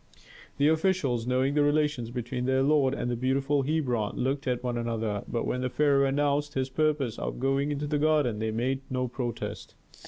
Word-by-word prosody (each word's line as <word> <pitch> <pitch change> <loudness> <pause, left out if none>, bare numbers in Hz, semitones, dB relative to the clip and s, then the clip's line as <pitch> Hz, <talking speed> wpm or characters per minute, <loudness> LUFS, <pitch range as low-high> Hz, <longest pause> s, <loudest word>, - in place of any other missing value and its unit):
The 145 - +3
officials, 155 -8 +1
knowing 130 +2 +1
the 150 - +3
relations 145 -5 +1
between 125 +1 -4
their 130 +1 +2
lord 140 -2 +3
and 125 - -2
the - - 0
beautiful 135 +3 +1
Hebron, 130 -7 -1
looked 135 +2 -1
at 125 -1 -1
one 125 -1 -1
another. 115 -3 -2
But 115 - -2
when 125 - -1
the 130 - -1
pharaoh 140 +1 +3
announced 145 +1 0
his 130 0 -1
purpose 145 -4 0
of - - -4
going 135 +2 +1
into 145 0 -2
the 145 0 0
garden 150 -8 +2
they 110 0 -1
made 125 +5 -1
no 125 -1 -1
protest. 120 -1 -5
135 Hz, 190 wpm, -28 LUFS, 125-145 Hz, -, The